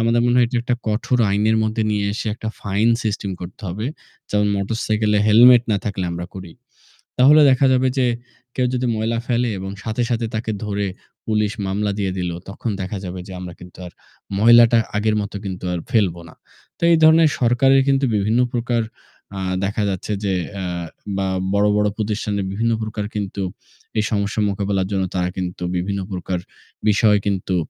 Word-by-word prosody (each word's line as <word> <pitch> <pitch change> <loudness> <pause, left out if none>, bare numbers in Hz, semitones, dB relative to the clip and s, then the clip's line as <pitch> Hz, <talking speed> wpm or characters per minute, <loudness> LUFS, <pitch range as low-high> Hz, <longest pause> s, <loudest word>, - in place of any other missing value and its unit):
আমাদের 115 +1 +2
মনে 120 0 +3
হয় 120 - +5
এটি 125 - -2
একটা 120 0 0
কঠোর 115 +3 0
আইনের 105 +2 +2
মধ্যে 110 +1 0
নিয়ে 105 -1 0
এসে 115 - -4
একটা 110 -2 -5
ফাইন 100 +3 +1
সিস্টেম 105 -2 -2
করতে 90 +4 -9
হবে। 105 +7 -4 0.4
যেমন 105 0 +2
মোটরসাইকেলে 105 +1 0
হেলমেট 120 +3 +7
না - - +2
থাকলে 100 -3 -2
আমরা 85 +1 -5
করি। 95 -2 -8 0.7
তাহলে 145 +4 +7
দেখা 130 +1 +4
যাবে 130 0 +2
যে, 130 - +3 0.5
কেউ 125 -1 +1
যদি 125 0 0
ময়লা 115 +1 -1
ফেলে 120 -1 +1
এবং 95 +1 -5
সাথে, 110 +2 -2
সাথে 115 -1 0
তাকে 110 0 -2
ধরে 100 -1 -1 0.4
পুলিশ 105 -1 +1 0.2
মামলা 100 +2 -1
দিয়ে 95 -2 0
দিলো 90 -1 -2
তখন 110 +2 -4
দেখা 95 +2 -4
যাবে 90 +1 -6
যে - - -9
আমরা 90 -1 -7
কিন্তু 90 0 -13
আর 90 - -9 0.5
ময়লাটা 115 +2 +7 0.2
আগের 110 +1 +1
মতো 100 0 -6
কিন্তু 95 -1 -5
আর 90 - -2
ফেলব 100 -8 +2
না। - - -14 0.4
তো - - -28
এই 165 - +6
ধরণের 160 0 +7
সরকারের 135 +3 +4
কিন্তু 135 0 +3
বিভিন্ন 105 +4 +1
প্রকার 120 -1 0 0.6
আ - - -3 0.2
দেখা 105 +1 -1
যাচ্ছে 95 +2 -4
যে 95 -1 0 0.3
আ - - -3 0.5
বা 95 -1 0 0.3
বড়, 100 +1 +3
বড় 105 0 +2
প্রতিষ্ঠানের 105 -2 -2
বিভিন্ন 115 +3 0
প্রকার 105 -1 -3
কিন্তু 100 -1 -3 0.6
এই 105 - +3
সমস্যা 105 +1 -1
মোকাবিলার 100 -1 -1
জন্য 95 -1 0
তারা 90 0 0
কিন্তু 90 -1 -4
বিভিন্ন 100 +2 -2
প্রকার 90 -1 -3 0.5
বিষয় 105 0 +4
কিন্তু 95 -2 -1
105 Hz, 180 wpm, -21 LUFS, 100-115 Hz, 0.7 s, হেলমেট